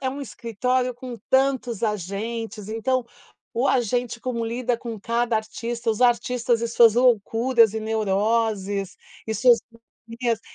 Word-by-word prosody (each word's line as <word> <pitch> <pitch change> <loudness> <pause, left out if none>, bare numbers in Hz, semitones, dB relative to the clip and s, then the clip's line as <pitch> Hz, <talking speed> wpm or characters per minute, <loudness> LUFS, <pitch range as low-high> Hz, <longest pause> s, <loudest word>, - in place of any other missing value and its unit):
É 265 - -1
um 275 +2 -5
escritório 250 0 -2
com 245 0 -8
tantos 260 -4 +1
agentes, 210 +1 -3
então 250 +3 0 0.5
o 245 +4 +1
agente 245 -1 0
como 235 -2 -2
lida 240 +1 -1
com 230 -3 -6
cada 235 +2 0
artista, 230 +2 -3
os 220 - -3
artistas 240 -1 +2
e 235 - -1
suas 230 -1 +5
loucuras 235 -1 +3
e 220 - -2
neuroses, 210 -2 0 0.3
e 220 - -2
suas 240 0 +5 0.5
manias, 230 -1 -1
235 Hz, 135 wpm, -24 LUFS, 220-245 Hz, 0.5 s, suas